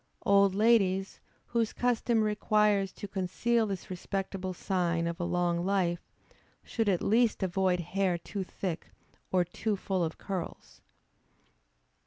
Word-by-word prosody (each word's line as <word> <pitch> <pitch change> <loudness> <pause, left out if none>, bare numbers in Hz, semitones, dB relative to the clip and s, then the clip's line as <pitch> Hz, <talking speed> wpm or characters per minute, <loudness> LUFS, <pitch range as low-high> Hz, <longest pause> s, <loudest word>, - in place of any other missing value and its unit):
Old 200 -1 +5
ladies, 195 -3 +3 0.3
whom 235 -1 +1
custom 235 0 +1
requires 210 -2 +2
to 205 - -7
conceal 215 +5 0
this 195 -2 -5
respectable 190 0 -3
sign 175 -2 0
of 170 +1 -3
a - - -1
long 175 0 0
life, 180 -3 +1 0.6
should 225 -3 -1
at 180 -3 +1
least 225 -1 +3
avoid 185 0 +1
hair 185 +1 0
too 195 +3 -5
thick 180 -2 -5 0.4
or 185 -1 +4
too 210 +4 -2
full 190 -2 -1
of 160 -1 -3
curls. 190 -4 -6
195 Hz, 130 wpm, -30 LUFS, 180-210 Hz, 0.6 s, Old